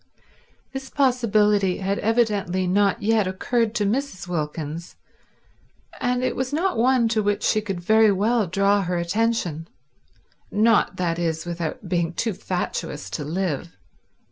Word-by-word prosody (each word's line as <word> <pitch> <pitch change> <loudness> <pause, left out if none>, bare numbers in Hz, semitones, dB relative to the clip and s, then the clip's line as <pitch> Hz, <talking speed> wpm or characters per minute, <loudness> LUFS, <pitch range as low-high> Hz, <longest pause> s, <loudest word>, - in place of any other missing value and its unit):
This 270 -1 -6
possibility 210 -8 +2
had 195 +1 -1
evidently 205 -5 +1
not 195 +2 +2
yet 215 -2 +2
occurred 225 +4 -1
to 210 - +1
Mrs. 215 -4 -2
Wilkins, 160 0 -4 1.0
and 250 0 0
it - - 0
was 260 +1 -2
not 335 +4 0
one 245 +1 +3
to 220 -1 +1
which 205 0 0
she 215 - +2
could 195 -4 -4
very 220 +4 +4
well 210 +2 +1
draw 200 +3 +2
her 180 -1 -1
attention; 175 -3 -1 0.8
not, 215 -2 +3
that 175 -2 -1
is, 160 -1 -1
without 170 +2 -4
being 170 -1 0
too 225 +4 -1
fatuous 175 -5 -4
to 150 - -3
live. 150 - -3
200 Hz, 140 wpm, -23 LUFS, 175-225 Hz, 1.0 s, very